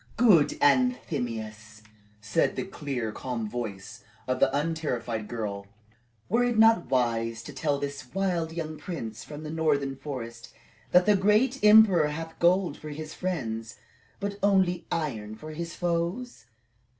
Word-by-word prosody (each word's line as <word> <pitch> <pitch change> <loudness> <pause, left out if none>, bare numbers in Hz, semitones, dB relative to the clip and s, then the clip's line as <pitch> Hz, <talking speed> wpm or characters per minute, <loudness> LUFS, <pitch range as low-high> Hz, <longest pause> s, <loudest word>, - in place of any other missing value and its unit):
"Good 205 -11 +5
Anthemius," 115 - 0 0.4
said 110 +10 +1
the - - -2
clear, 140 - -4
calm 120 -2 -4
voice 105 -4 -6 0.2
of 130 - 0
the - - +5
unterrified 135 -8 -2
girl, 100 -4 -4 0.6
"were 235 +5 +2
it 240 -2 0
not 225 -4 +5
wise 115 -3 0
to - - -9
tell 145 -3 0
this 140 -2 -6
wild 180 -4 -1
young 155 -2 -5
prince 115 - -6
from 150 0 -9
the 155 - -5
northern 145 -4 0
forest 120 -5 -7 0.3
that 180 0 +5
the 210 - +5
great 210 +7 +2
emperor 210 -7 +7
hath 160 +2 -6
gold 175 -2 +3
for 155 - -8
his 155 +1 -7
friends, 115 -11 -4 0.4
but 200 0 -4
only 190 -3 +2
iron 110 -10 -3
for 155 +7 -9
his 165 +2 -6
foes? 175 - -2
155 Hz, 140 wpm, -27 LUFS, 120-180 Hz, 0.6 s, emperor